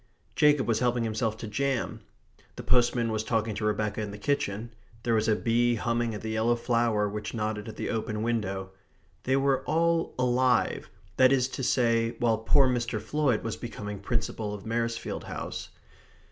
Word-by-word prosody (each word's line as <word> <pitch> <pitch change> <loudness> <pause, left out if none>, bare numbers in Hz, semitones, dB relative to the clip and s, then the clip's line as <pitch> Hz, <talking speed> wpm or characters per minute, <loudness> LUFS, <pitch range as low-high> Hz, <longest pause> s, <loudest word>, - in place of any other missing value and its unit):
Jacob 150 -2 +4
was 115 -2 +2
helping 125 -1 +1
himself 110 0 -1
to - - -6
jam; 135 +4 -1 0.5
the - - -7
postman 120 -1 +2
was 110 0 -1
talking 110 -1 0
to 105 +2 -4
Rebecca 105 0 0
in 105 - -3
the 100 - -7
kitchen; 115 -3 -2 0.3
there 120 - +1
was 110 -1 +2
a 110 - +4
bee 120 +1 +2
humming 115 0 -1
at 105 - -6
the 110 - -4
yellow 110 +2 +2
flower 115 -3 +1
which 105 +3 -5
nodded 105 -1 -2
at 110 - -8
the - - -3
open 110 -1 -2
window. 100 -5 -2 0.5
They 130 - +2
were 135 -1 +2
all 165 +1 +1
alive, 125 -1 +2 0.3
that 130 0 +6
is 130 -2 +3
to 135 - -5
say, 115 -2 +2
while 115 -3 +2
poor 135 +4 +4
Mr. 120 -2 -1
Floyd 145 -7 0
was 115 - -3
becoming 105 -4 -6
Principal 105 0 -2
of 100 - -10
Maresfield 115 +1 -2
House. - - -5
115 Hz, 175 wpm, -28 LUFS, 110-125 Hz, 0.5 s, that